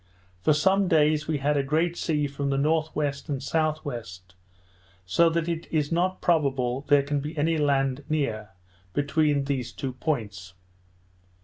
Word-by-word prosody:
For 155 - +3
some 190 +6 +3
days 150 -2 +3
we 155 -2 0
had 145 +1 +1
a - - +3
great 160 +5 0
sea 150 -4 0
from 140 0 -3
the 135 - +1
N.W. 155 +2 +1 0.4
and 145 -3 -2
S.W., 155 -2 -1 1.0
so 165 - +4
that 165 0 -1
it 170 -1 -3
is 150 -2 0
not 180 +3 0
probable 135 -6 +1
there 145 -1 +5
can 145 +1 -1
be 150 +3 -6
any 160 +2 +1
land 135 -1 +1
near, 115 -9 -1 0.4
between 145 - +1
these 130 -4 -2
two 130 +1 -5
points. 105 - -4
145 Hz, 150 wpm, -26 LUFS, 135-160 Hz, 1.0 s, there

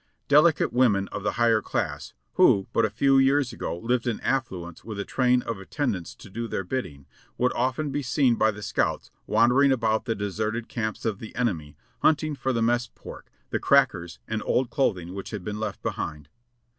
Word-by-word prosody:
Delicate 150 -2 +4
women 110 -6 +3
of - - -5
the 105 - -1
higher 115 -2 +3
class, - - -3 0.2
who 95 -1 +5
but 115 - +3
a - - 0
few 135 +6 +3
years 135 0 +3
ago - - -4
lived 120 +5 -1
in 115 - -1
affluence 95 -11 -3
with 110 -3 -6
a 100 - -3
train 125 -1 +2
of 115 -4 -4
attendants 95 - -3
to - - -13
do 115 +4 -5
their 95 - -3
bid 130 +7 -2
ding, 70 -3 -13 0.3
would 125 +1 +1
often 130 +4 -1
be 145 - -1
seen 130 -1 +2
by 110 -1 +3
the 105 -1 -6
scouts - - -1 0.2
wandering 125 +5 +4
about 110 -3 +1
the 115 -3 -1
deserted 110 +3 -3
camps 110 -2 -4
of 110 -3 -1
the 110 - -9
enemy 80 -12 -2 0.2
hunting 155 0 +2
for 130 -2 -2
the 115 -2 0
mess 120 +1 +1
pork, - - -11 0.2
the - - 0
crackers 85 -1 +2
and 110 -1 -2
old 125 -1 0
clothing 95 - 0
which 95 0 -6
had 105 -5 -6
been 105 +2 -4
left 105 -2 -4
behind. 75 -2 -4
115 Hz, 195 wpm, -26 LUFS, 100-130 Hz, 0.3 s, who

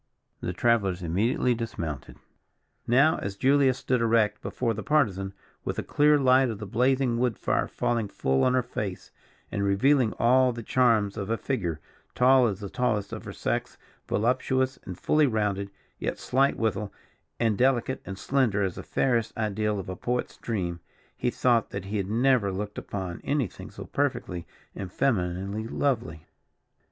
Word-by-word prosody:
The - - -3
travellers 100 -7 +1
immediately 105 +9 +1
dismounted. 85 - -5 0.7
Now, 140 +7 +4
as 100 0 -4
Julia 135 +1 +4
stood 125 -1 0
erect 115 -2 +2
before 115 -2 -1
the 110 - -5
Partisan, 100 -11 +1 0.3
with - - -3
the - - -3
clear 150 0 +4
light 130 -1 +4
of 110 - -4
the 105 - -6
blazing 125 +3 +1
wood 125 -4 +1
fire - - 0
falling 115 -3 -1
full 65 -7 0
on 125 - +3
her 130 - +2
face, 100 -5 -5 0.4
and 100 - -1
revealing 115 +5 +3
all 125 +2 +4
the 115 0 -7
charms 110 -5 +2
of 100 0 -4
a 115 - +1
figure, 90 - -2 0.4
tall 130 0 +5
as 100 -1 -3
the 100 - -5
tallest 105 -5 -1
of - - -6
her - - -6
sex, - - -3 0.3
voluptuous 130 +4 +1
and 90 -2 -7
fully 155 -1 +3
rounded, 105 -4 -1 0.3
yet - - -2
slight 135 +2 +1
withal, 105 -2 -1 0.5
and 115 -3 +2
delicate 130 +1 +1
and 95 -1 -7
slender 115 -5 +1
as 95 -2 -1
the - - -4
fairest 120 -4 0
ideal 105 -1 0
of 95 - -5
a 95 - -4
poet's 125 +6 -2
dream, 90 -7 -3 0.4
he 125 - 0
thought 120 -2 +2
that 100 -1 -5
he 105 +2 -3
had 95 -1 -2
never 120 -2 +3
looked 105 +2 -4
upon 95 -3 -5
anything 140 - -2
so - - -9
perfectly 120 -11 -2 0.3
and 95 -3 -6
femininely 100 -2 -1
lovely. 85 - -1
115 Hz, 165 wpm, -27 LUFS, 100-130 Hz, 0.7 s, tall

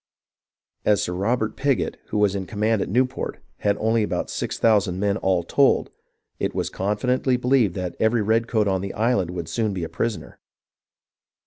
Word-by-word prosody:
As 105 -2 +3
Sir 90 - -2
Robert 110 +4 0
Pigot, 140 -2 0
who 105 - -3
was 105 -2 +3
in 95 -2 -4
command 110 0 0
at - - -2
Newport, 125 +5 0 0.2
had 100 -1 0
only 110 +1 +1
about 105 - -2
six - - -3
thousand 100 -5 +2
men 100 0 +1
all 95 -4 +1
told, - - +2 0.5
it - - -2
was - - -2
confidently 125 +6 0
believed 125 -7 +2
every 110 +5 0
redcoat 110 0 +1
on 95 -1 +1
the 100 0 -5
island 110 -5 +1
would 85 -3 -5
soon 110 -4 -1
be 90 - -3
a 80 - -4
pris 115 -2 -1
oner. - - -13
105 Hz, 175 wpm, -23 LUFS, 95-115 Hz, 0.5 s, As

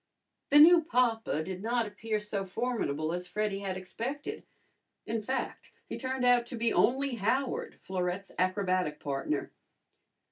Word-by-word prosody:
The 290 - +6
new 335 +3 +9
papa 235 - +1
did 185 +2 -6
not 235 +2 +1
appear 215 +1 -3
so 210 -1 -3
formidable 185 - -2
as 180 0 -4
Freddy 205 +1 -1
had 190 -2 -3
expected. 235 +10 -5 0.6
In 225 0 -2
fact, 260 +5 -4
he - - -6
turned 260 -1 -2
out 245 -1 +4
to 245 - -5
be 230 0 +1
only 265 0 +2
Howard, 250 +6 -1
Florette's 185 +1 -3
acrobatic 185 -4 +1
partner. 140 +1 -2
215 Hz, 140 wpm, -30 LUFS, 185-245 Hz, 0.6 s, new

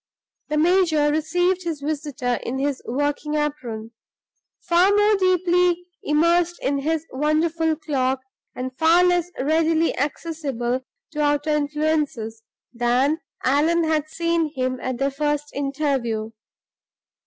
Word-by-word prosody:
The 300 - 0
major 320 -3 +3
received 355 +4 +1
his 330 -4 -3
visitor 285 -4 -2
in 255 - -4
his 275 0 -1
working 290 +4 -1
apron 250 -7 -3 0.7
far 350 +2 +3
more 415 +1 +4
deeply 360 -2 +2 0.2
immersed 335 +3 +2
in 280 +1 0
his 320 +2 -1
wonderful 315 +3 +1
clock, 265 -4 -1 0.3
and 255 0 -5
far 330 +2 +5
less 355 -1 +2
readily 320 +3 +2
accessible 275 -4 -2 0.3
to 300 -1 -3
outer 290 +1 +1
influences, 295 -6 -1 0.3
than 250 +6 +1 0.2
Allan 315 +6 +3
had 310 -1 0
seen 335 -1 0
him 255 -1 -1
at 255 -1 -3
their 275 +2 0
first 295 +1 -2
interview. 275 -6 -1
300 Hz, 120 wpm, -23 LUFS, 275-330 Hz, 0.7 s, far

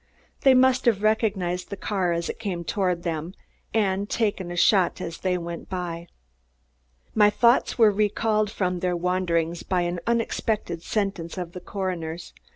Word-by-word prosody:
They 265 -1 +5
must 260 0 +4
have 215 -4 +2
recognized 195 -5 0
the 200 - -5
car 190 -4 -1
as 170 0 -1
it - - -5
came 190 -6 -3
toward 180 -2 -1
them 165 +2 -3 0.4
and 200 -2 0
taken 205 -5 -1
a 175 - -5
shot 185 0 +3
as 165 -1 -6
they 185 -1 0
went 170 -1 -6
by. 175 -2 -4 1.1
My 210 -1 +6
thoughts 235 +3 +3
were 225 -3 +6
recalled 210 +1 +1
from 180 -4 -1
their 180 0 0
wanderings 170 -2 0
by 185 -2 0
an 175 0 -2
unexpected 225 -6 -1
sentence 195 -4 -2
of 175 -2 -4
the 180 - -7
coroner's. 175 -4 -4
185 Hz, 160 wpm, -25 LUFS, 175-210 Hz, 1.1 s, My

